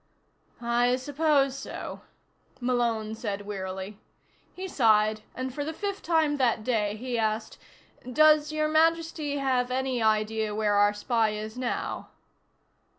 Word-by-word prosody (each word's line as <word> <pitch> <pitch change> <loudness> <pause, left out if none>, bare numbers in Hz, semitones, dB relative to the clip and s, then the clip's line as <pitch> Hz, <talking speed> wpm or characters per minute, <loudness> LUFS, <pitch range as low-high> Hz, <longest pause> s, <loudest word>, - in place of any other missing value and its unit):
"I 240 +1 +2
suppose 280 0 +1
so," - - -7 0.6
Malone 235 -3 0
said 205 -3 -4
wearily. 190 0 -5 0.6
He 375 +1 -5
sighed 215 - +3
and, 255 0 -4
for 290 - -3
the 315 +2 -4
fifth 400 0 -3
time 315 -3 +2
that 235 -5 +1
day, 215 -4 0
he 240 +1 -3
asked: 220 0 -2 0.5
"Does 305 +2 +5
Your 310 0 0
Majesty 320 -2 +1
have 255 -2 +1
any 260 -1 -1
idea 215 0 +1
where 210 -1 +1
our 205 0 +4
spy 225 +1 +1
is 215 +1 -6
now?" 250 -1 -3
245 Hz, 130 wpm, -27 LUFS, 215-290 Hz, 0.6 s, Does